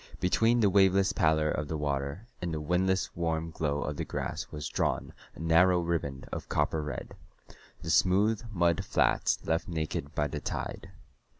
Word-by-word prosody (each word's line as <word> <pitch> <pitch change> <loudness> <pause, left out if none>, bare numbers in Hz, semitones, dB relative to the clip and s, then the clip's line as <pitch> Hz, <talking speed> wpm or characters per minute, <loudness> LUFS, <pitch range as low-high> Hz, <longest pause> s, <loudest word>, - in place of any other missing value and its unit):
Between 115 +6 +3
the 105 - +5
waveless 95 0 +4
pallor 80 -3 +2
of 75 - -2
the 80 - -3
water 70 +6 -2 0.2
and 90 -1 -2
the 80 - -2
windless 90 +4 0
warm 80 -1 -1
glow 75 -2 -1
of 75 -1 -4
the - - -1
grass - - -4
was 75 -2 -5
drawn - - -1 0.2
a - - -13
narrow 85 +3 +4
riband 80 -6 -2
of - - -6
copper 75 +1 +1
red 75 -1 -6 0.7
the 80 - -2
smooth 100 +5 +3
mud 85 -4 +2
flats - - +2
left 80 +1 0
naked 80 -4 -3
by 75 - +1
the 75 +1 -4
tide. 95 - -5
80 Hz, 170 wpm, -29 LUFS, 75-90 Hz, 0.7 s, the